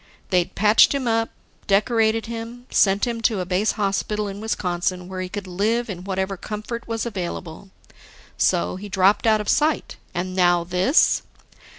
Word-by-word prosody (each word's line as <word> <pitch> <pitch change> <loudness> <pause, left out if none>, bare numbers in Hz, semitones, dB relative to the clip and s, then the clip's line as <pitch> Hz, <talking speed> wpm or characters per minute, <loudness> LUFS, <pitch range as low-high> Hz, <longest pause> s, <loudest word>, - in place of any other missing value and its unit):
They'd 180 0 +1
patched 210 +7 +5
him 265 -3 -2
up, 225 0 +1 0.4
decorated 220 +2 +2
him, 235 +1 -7
sent 195 +2 +3
him 235 -2 -3
to 220 -3 +1
a 180 - -2
base 185 +4 +1
hospital 210 +1 -1
in 200 +1 -7
Wisconsin 180 -4 -2
where 185 0 -5
he 185 - -4
could 205 0 -5
live 215 +5 -1
in 180 -2 -7
whatever 190 0 -2
comfort 215 +4 -6
was 230 0 -2
available. 180 -4 -5 0.7
So, 85 - +1
he 205 +2 -8
dropped 195 +3 +3
out 215 -1 +4
of 210 - -8
sight. 305 +1 +1 0.2
And 185 +1 -3
now, 175 -2 +3
this! 180 - +3
200 Hz, 165 wpm, -22 LUFS, 185-225 Hz, 0.7 s, patched